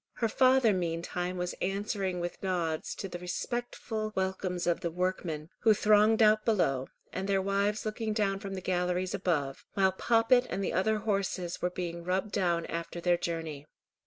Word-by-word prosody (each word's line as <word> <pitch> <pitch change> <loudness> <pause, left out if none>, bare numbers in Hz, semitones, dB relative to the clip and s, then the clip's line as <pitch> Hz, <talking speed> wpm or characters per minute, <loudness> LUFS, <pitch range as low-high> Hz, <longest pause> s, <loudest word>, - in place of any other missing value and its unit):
Her 230 - 0
father 255 -1 +4
meantime 175 +1 -2
was 180 0 -2
answering 195 -1 -1
with 175 0 -4
nods 170 -4 -1
to 195 - -5
the 175 -1 -7
respectful 220 +3 -3
welcomes 190 -1 -1
of 175 -1 +1
the 170 - -2
workmen, 170 -3 -2
who 220 -1 +5
thronged 215 +2 +5
out 215 0 +5
below, 135 - +1 0.3
and 190 +1 -3
their 195 -1 +3
wives 200 +2 0
looking 215 0 -2
down 200 -2 0
from 195 -1 -5
the 185 - -5
galleries 180 0 0
above; 145 -7 -1
while 190 -1 +4
Poppet 235 +5 +3
and 195 - -2
the - - -1
other 215 +5 +2
horses 195 -4 -2
were 180 - +1
being 170 -1 -5
rubbed 190 +4 -1
down 175 -5 +1
after 170 +1 -5
their 175 0 +3
journey. 160 -4 -4
185 Hz, 170 wpm, -30 LUFS, 175-210 Hz, 0.3 s, who